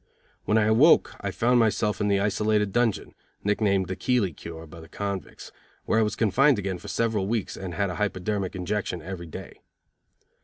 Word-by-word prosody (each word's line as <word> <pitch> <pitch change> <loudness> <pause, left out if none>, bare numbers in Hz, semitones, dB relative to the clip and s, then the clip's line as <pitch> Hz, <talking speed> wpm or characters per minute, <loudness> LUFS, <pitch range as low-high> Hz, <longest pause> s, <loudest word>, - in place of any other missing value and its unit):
When 105 - +2
I 110 - +4
awoke 115 +10 +5
I 100 - -2
found 120 +5 +2
myself 105 -1 +1
in 105 - +1
the 100 -1 +2
isolated 105 0 +1
dungeon, 120 -4 0 0.3
nicknamed 100 -2 +1
the 95 - -3
Keeley 100 -2 0
Cure 80 +2 -9
by 85 +1 -12
the 80 - -13
convicts, 100 -2 -5 0.3
where 110 - +2
I - - +4
was 105 -1 0
confined 130 +6 +3
again 95 -3 -3
for - - -11
several 110 -4 0
weeks, 110 -2 -2
and 90 -2 -6
had 100 -2 0
a - - -6
hyperdermic 100 -1 -2
injection 90 -2 -3
every 90 -1 -7
day. 80 - -10
100 Hz, 185 wpm, -26 LUFS, 95-110 Hz, 0.3 s, awoke